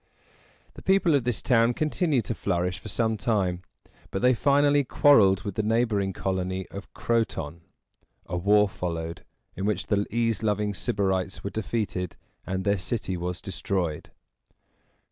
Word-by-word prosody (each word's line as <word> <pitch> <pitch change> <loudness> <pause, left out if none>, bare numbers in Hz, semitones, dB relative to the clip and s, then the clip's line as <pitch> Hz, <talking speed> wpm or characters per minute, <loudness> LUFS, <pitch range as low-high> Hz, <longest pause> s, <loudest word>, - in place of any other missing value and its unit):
The - - -11
people 190 -4 +3
of 135 -4 +2
this 125 -3 -1
town 120 -1 +3
continued 155 -4 +1
to - - -2
flourish 90 -3 -1
for - - -10
some 110 +1 0
time, 95 -4 0 0.5
but 95 +4 -3
they 125 +1 +6
finally 145 +3 +3
quarreled 105 -9 +5
with 100 - -4
the 110 - 0
neighboring 110 -3 +1
colony 95 0 -2
of 100 0 -9
Croton. 110 -9 -1 0.6
A - - -4
war 105 +3 +4
followed, 85 -3 -4 0.3
in 95 - -3
which 100 -3 0
the 100 0 0
ease 115 -2 0
loving 105 -1 0
Sybarites 95 +2 -1
were 100 - -3
defeated 105 -4 -3 0.3
and 95 0 -2
their 100 0 +1
city 95 -1 -2
was 90 0 -4
destroyed. 95 -6 -3
100 Hz, 145 wpm, -26 LUFS, 95-115 Hz, 0.6 s, they